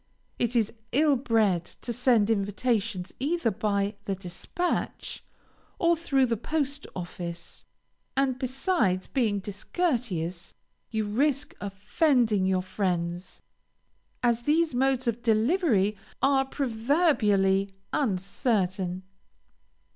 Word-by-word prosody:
It 240 +1 0
is 225 -3 +2 0.2
ill 295 +2 +4
bred 220 - +2
to 240 - -7
send 235 -3 +3
invitations 200 -2 -1
either 290 -2 +1
by 200 0 -1
the 195 - -1
dispatch, 190 - -3 0.5
or 340 -2 +3
through 275 -5 +2
the 235 -2 0
post 285 +3 -2
office; 175 -1 -6 0.5
and 265 -2 +1
besides 255 - 0
being 225 -7 0
discourteous, 200 - -2 0.3
you 220 -1 -1
risk 275 +6 0
offending 210 - +2
your 185 -1 +1
friends, 180 -2 -2 0.8
as 235 -1 +2
these 310 +4 +2
modes 260 0 +1
of 235 0 0
delivery 225 - +2 0.2
are 270 0 +3
proverbially 225 - +2 0.2
uncertain. 190 -5 0
225 Hz, 100 wpm, -27 LUFS, 195-270 Hz, 0.8 s, ill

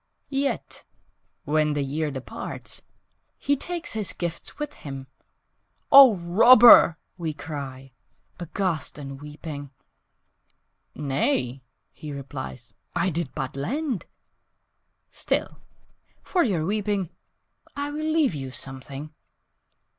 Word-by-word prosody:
Yet 275 0 -2 0.6
when 150 0 +2
the 145 -1 0
year 150 +3 -2
departs 135 -2 -6 0.6
He 285 - +1
takes 340 +4 -5
his 215 -3 -1
gifts 170 -2 -5
with 295 -1 -4
him 135 -2 -8 0.9
"Oh, 270 -5 +10
Robber!" 205 +1 +8 0.2
we 160 -3 -3
cry, 135 -4 -7 0.5
Aghast 175 -2 -2
and 135 -1 -8
weeping, 150 -1 -7 1.3
"Nay," 135 - -1 0.3
he 150 - -9
replies, 130 - -7 0.2
"I 185 - +1
did 165 -3 -3
but - - -4
lend. 250 - -2 1.0
Still, - - -2 0.6
for 360 -2 +2
your 180 - 0
weeping, 200 -2 -1 0.6
I 285 0 -3
will 310 +1 -2
leave 310 - +3
you 135 -3 -5
something. 135 +3 -6
160 Hz, 100 wpm, -25 LUFS, 140-235 Hz, 1.3 s, Oh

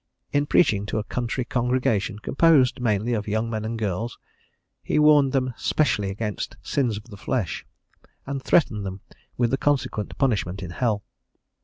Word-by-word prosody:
In 145 0 +2
preaching 105 - +3
to 110 - -2
a 110 - -1
country 125 +2 -3
congregation 120 -5 0
composed 135 +2 +3
mainly 110 0 +1
of 105 -2 -2
young 110 +2 -1
men 110 -1 -2
and 115 +1 -3
girls, 110 +2 -2 0.6
he - - -1
warned 150 -3 +6
them 130 -2 0
specially 105 -10 +1
against 105 +1 -4
sins 125 -7 0
of 105 - -8
the 105 -3 -12
flesh, 110 -2 -2 0.6
and 135 0 -4
threatened 115 -10 +2
them 95 0 -6 0.4
with 120 -2 +2
the 135 - +2
consequent 135 -7 -1
punishment 100 -8 0
in 85 - -6
hell. 105 +1 0
115 Hz, 160 wpm, -24 LUFS, 105-130 Hz, 0.6 s, warned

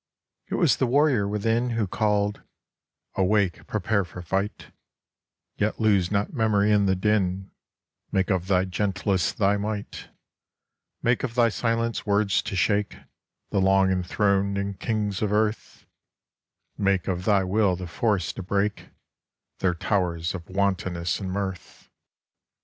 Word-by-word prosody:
It - - -3
was - - +3
the 130 - +1
warrior 130 -5 +3
within 115 +4 0
Who 110 - +1
called 105 0 0 0.4
* - - -50
Awake, 95 -1 +1
prepare 100 -3 0
for 90 0 -9
fight: 95 +4 -3 0.9
Yet 105 +1 -1
lose 100 -5 +3
not 100 -1 -1
memory 105 -4 +2
in 100 -1 +3
the 95 - +2
din: 95 -1 0 0.6
Make 95 +1 +1
of 95 -1 0
thy 95 -1 +2
gentleness 95 -1 0
thy 100 0 +1
might: 105 0 -5 0.5
' - - -54
Make 120 +1 +2
of 120 -3 -4
thy 120 -2 +4
silence 115 +1 -1
words 100 -1 +2
to - - -5
shake 100 +3 +1 0.6
The 100 - +1
long 95 0 +4
enthroned 100 +1 0
kings 105 -4 -2
of 105 -2 0
earth: 110 +1 -1 0.9
Make 100 -2 +1
of 90 -1 -2
thy 100 -2 +3
will 95 0 +2
the 90 +1 -6
force 90 -1 -1
to - - -6
break 100 +2 -1 0.7
Their 90 -2 +1
towers 85 -2 -1
of 85 -4 -8
wantonness 95 -3 -1
and 95 -3 -4
mirth.' 95 -1 -6
100 Hz, 140 wpm, -25 LUFS, 95-105 Hz, 0.9 s, thy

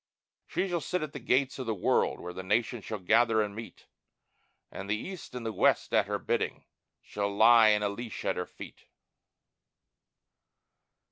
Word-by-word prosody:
She 195 - -1
shall 175 -3 -2
sit 180 +1 -2
at 150 - -6
the 140 - -6
gates 130 +2 +1
of 130 - -5
the 110 - 0
world, 90 - +1
where 90 0 -7
the 95 - -6
nations 110 +3 -1
shall 110 - -4
gather 110 +4 +3
and 105 -1 -1
meet, 115 +1 -10 0.9
And 100 +1 -7
the 105 - +1
East 185 - -8
and 120 -2 -5
the 110 - -2
West - - +2
at - - +3
Her - - -1
bidding - - -2 0.4
shall 100 -1 -3
lie 110 +2 +6
in 105 -1 +3
a 105 - +1
leash 115 +2 -7
at - - +1
Her - - -3
feet. - - -12
115 Hz, 180 wpm, -29 LUFS, 105-125 Hz, 0.9 s, lie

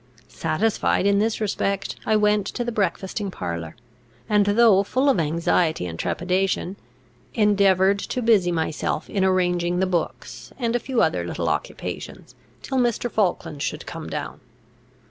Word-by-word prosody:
Satisfied 185 +4 0
in 200 0 +3
this 220 +1 0
respect, 200 -2 -1
I 215 - +3
went 210 -1 +2
to 240 - -3
the 240 - -3
breakfasting 200 -1 -2
parlour, 85 - -5 0.5
and, 210 -1 +3
though 205 -2 +5
full 260 +7 +1
of 260 - +3
anxiety 160 - +1
and 85 -2 -6
trepidation, 185 +1 -1 0.6
endeavoured 200 -2 +3
to 250 +4 -3
busy 205 -6 +4
myself 160 -2 -2
in 195 -3 0
arranging 180 -2 +1
the 190 - +2
books, 175 -3 -4
and 235 -2 -1
a - - +2
few 255 0 0
other - - +1
little - - -3
occupations, - - -5 0.3
till 265 -1 -1
Mr. 240 -1 0
Falkland 175 -7 -1
should 150 +1 -3
come 165 -2 -7
down. 150 -1 -5
195 Hz, 145 wpm, -23 LUFS, 175-215 Hz, 0.6 s, though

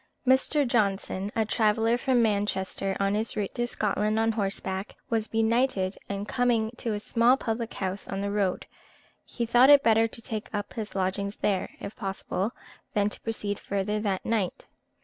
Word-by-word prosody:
Mr. 265 +2 +3
Johnson, 200 -3 0
a 220 -1 +2
traveller 225 +1 +2
from 245 -1 +2
Manchester, 200 -2 -1
on 195 0 +1
his 220 +2 -1
route 205 -2 -2
through 240 0 -1
Scotland 210 -1 0
on 225 0 +3
horseback, 195 -2 -3 0.2
was 225 -1 +1
benighted, 225 -3 +1
and 200 +1 -3
coming 235 -3 +1
to 230 - -2
a - - -3
small 235 +4 +3
public 230 -2 -3
house 190 +1 -3
on 195 - -3
the 200 0 -2
road, 200 -3 0 0.6
he 235 - -3
thought 245 +3 +6
it 285 -1 +8
better 225 0 +4
to 225 - -7
take 225 -2 -5
up 205 -1 -4
his 215 -3 -6
lodgings 195 +2 -1
there, 195 -3 0
if 200 - -7
possible, 195 0 -3 0.4
than 205 0 +3
to - - -8
proceed 210 -3 -3
further 200 +2 -1
that 200 -3 -2
night. 215 -5 -1
215 Hz, 170 wpm, -27 LUFS, 200-230 Hz, 0.6 s, it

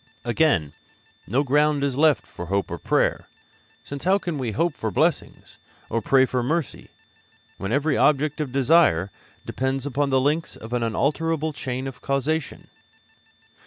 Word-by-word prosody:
Again, 120 - +1 0.5
no 125 - +1
ground 145 +1 +2
is 140 -2 0
left 150 +1 +3
for 90 - -9
hope 100 +2 -1
or - - -4
prayer, - - 0 0.6
since 140 -1 -7
how 190 +2 +4
can 170 -7 -4
we 120 -4 -3
hope 170 - 0
for 110 - -3
blessings, 100 - -1 0.3
or 115 - 0
pray 130 +4 +4
for 125 -1 -1
mercy, 155 +4 -3 0.7
when 95 +2 -4
every 140 +3 +1
object 150 +1 +2
of 140 -4 -3
desire 130 - +3 0.3
depends 130 +1 -2
upon 145 +1 0
the 135 -1 +3
links 150 +5 0
of 115 +2 -9
an 120 - 0
unalterable 155 +7 0
chain 130 -2 -4
of 135 -1 -7
causation? 140 +2 -2
140 Hz, 155 wpm, -24 LUFS, 125-150 Hz, 0.7 s, how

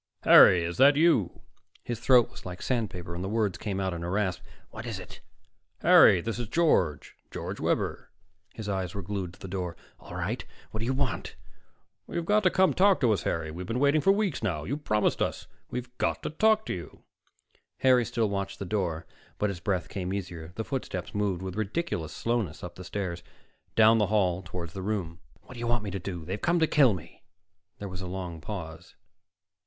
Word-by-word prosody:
"Harry! 90 -2 +8
Is 85 +1 -3
that 140 +2 +7
you?" 150 - +3 0.4
His 120 -2 -4
throat 125 0 +5
was - - -12
like 90 0 -7
sandpaper 95 -8 -2
and 90 +1 -4
the 95 - -3
words 105 -4 0
came 100 -3 -3
out 95 -1 -1
in 85 0 -5
a 85 - -3
rasp. 95 -1 0 0.3
"What - - -7
is - - -3
it?" - - -10 0.6
"Harry, 90 - +7
this 115 +3 -3
is 120 - -3
George 105 - +1
George - - -5
Webber." - - -1 0.5
His 110 -2 -6
eyes 95 -3 -2
were 100 - -4
glued 95 -1 -4
to - - -25
the - - -8
door. 90 -2 -4 0.2
"All - - -10
right. - - -2 0.3
What 110 - -4
do 115 - -2
you 130 - +1
want?" 135 -2 -2 0.7
"You've 170 - -3
got 210 +4 +3
to 185 - +4
come 190 +1 +3
talk 195 +1 +4
to 120 -4 +4
us, 100 - -1
Harry. 80 -1 -2
We've 90 +3 -7
been 115 - -2
waiting 145 +2 +4
for 195 - +5
weeks 200 -5 0
now. 85 -9 -1
You 120 - -2
promised 110 -8 0
us. - - -1 0.2
We've 125 0 -6
got - - 0
to - - -3
talk 220 +6 +3
to - - -2
you." 85 -2 -9 0.8
Harry 130 -2 +5
still 115 -1 0
watched 100 -1 -3
the 100 - -5
door, 85 -5 -2 0.3
but 105 -1 0
his 90 - -7
breath 90 -1 -1
came 95 -2 -4
easier. 90 -4 -5
The 110 - -3
footsteps 110 - -4
moved 100 -3 -1
with 95 -1 -5
ridiculous 110 - -2
slowness 115 -9 -2
up 90 -1 -6
the 90 - -10
stairs, 90 -2 -4 0.5
down 115 0 +6
the 105 - +2
hall 95 -4 +1
toward 85 -2 -6
the 95 +1 -6
room. 95 -4 -3 0.2
"What - - -12
do 120 - -10
you 120 - -2
want 120 -2 +1
me 100 - -4
to 100 - -3
do? 90 -3 -6
They've 95 +4 -4
come 175 +1 +2
to 160 - +4
kill 135 -9 +4
me." 85 - -12 0.6
There 100 - -6
was 95 -1 -7
a 95 - -5
long 90 -3 -5
pause. 80 -5 -7
100 Hz, 210 wpm, -28 LUFS, 90-120 Hz, 0.8 s, Harry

